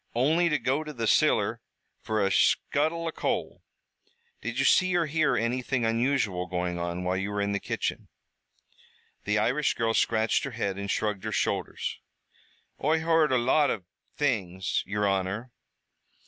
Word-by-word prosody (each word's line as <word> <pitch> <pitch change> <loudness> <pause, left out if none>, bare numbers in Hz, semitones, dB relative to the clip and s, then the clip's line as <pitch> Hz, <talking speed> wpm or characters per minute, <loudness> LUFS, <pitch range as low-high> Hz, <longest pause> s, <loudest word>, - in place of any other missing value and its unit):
"Only 160 +8 +3
to 150 - +2
go 135 +4 0
to 155 -1 -7
the 115 -3 -3
ciller - - +2 0.4
fer 110 -2 0
a 95 - 0
scuttle 160 +10 +2
o' 165 - -1
coal." - - -3 0.8
"Did - - -4
you - - +2
see 185 -1 +4
or 170 -1 +2
hear 155 -3 +1
anything 120 +1 -1
unusual 115 -6 0
going 90 0 -2
on 85 +1 -3
while 90 +1 0
you 95 +1 -2
were 105 0 -3
in 100 0 0
the 100 - 0
kitchen?" - - -3 1.2
The 105 +1 +1
Irish 130 +8 +1
girl 115 -1 0
scratched 110 0 +2
her 140 - -4
head 100 -4 -2
and 100 0 -5
shrugged 105 -1 -1
her - - -3
shoulders. - - -2 0.8
"Oi 160 +3 +2
heard 160 -2 +3
a 130 - +4
lot 130 +5 +3
av 100 - -2 0.3
things, 95 -10 0
yer 105 +1 -1
honor." 100 +5 -1
115 Hz, 160 wpm, -27 LUFS, 100-145 Hz, 1.2 s, see